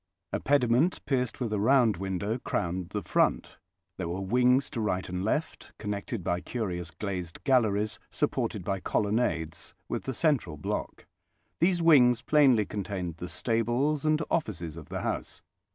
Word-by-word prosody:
A - - 0
pediment, 140 +4 +2
pierced 125 -4 -1
with 120 -4 -2
a 105 - 0
round 115 -1 +4
window, 95 +5 -2
crowned 90 -5 -2
the 105 0 -3
front. - - +1 0.4
There 90 -3 -3
were 90 +2 -3
wings 125 +7 +3
to 115 - -3
right 95 -3 -1
and 90 +1 -3
left, 150 +10 -2
connected 105 0 -4
by 85 +1 -1
curious 90 -8 -3
glazed 90 -4 -5
galleries, 110 -5 +2
supported - - -1
by 95 +1 -1
colonnades, 85 -7 -1
with - - -3
the 130 - -3
central 130 - +1
block. 75 - -4 0.5
These 175 0 +2
wings 125 -7 +6
plainly 135 -8 +4
contained 95 -5 -4
the 90 +1 -6
stables 120 +6 0
and 155 0 +3
offices 90 - -2
of 80 -2 -10
the - - -3
house. - - -3
105 Hz, 150 wpm, -28 LUFS, 90-125 Hz, 0.5 s, wings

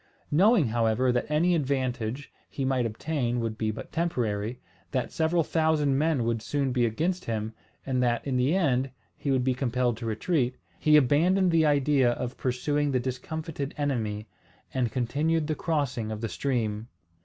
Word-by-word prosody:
Knowing, 180 - +4
however, 115 +2 +2
that 120 +3 -1
any 165 +4 +3
advantage 130 -4 -2 0.2
he 135 - -3
might 130 -3 +1
obtain 120 +1 -2
would 115 -2 -2
be 110 -1 -1
but 110 - -6
temporary, 120 -9 -1 0.3
that 125 +6 -2
several 160 +1 +1
thousand 155 -3 +2
men 150 -3 +1
would 115 -1 -1
soon 135 +3 -1
be 125 -2 +2
against 170 +11 -1
him, 110 -1 -3 0.3
and 130 -2 0
that 120 -1 +1
in 135 -2 -1
the 130 +7 +2
end 135 -7 +1 0.3
he 145 - -4
would 130 -2 +2
be 130 0 +2
compelled 125 -2 0
to 115 - -5
retreat, 125 +3 0 0.2
he 150 0 +5
abandoned 170 +7 +3
the 160 -2 +4
idea 140 -3 +3
of 125 +2 -4
pursuing 145 +3 0
the 130 -2 +1
discomfited 140 +3 -4
enemy, 110 -7 -2 0.5
and 125 -4 0
continued 150 +7 0
the 155 - -1
crossing 140 -9 -1
of 110 0 -5
the 115 - -2
stream. 115 -5 -2
130 Hz, 165 wpm, -27 LUFS, 120-150 Hz, 0.5 s, he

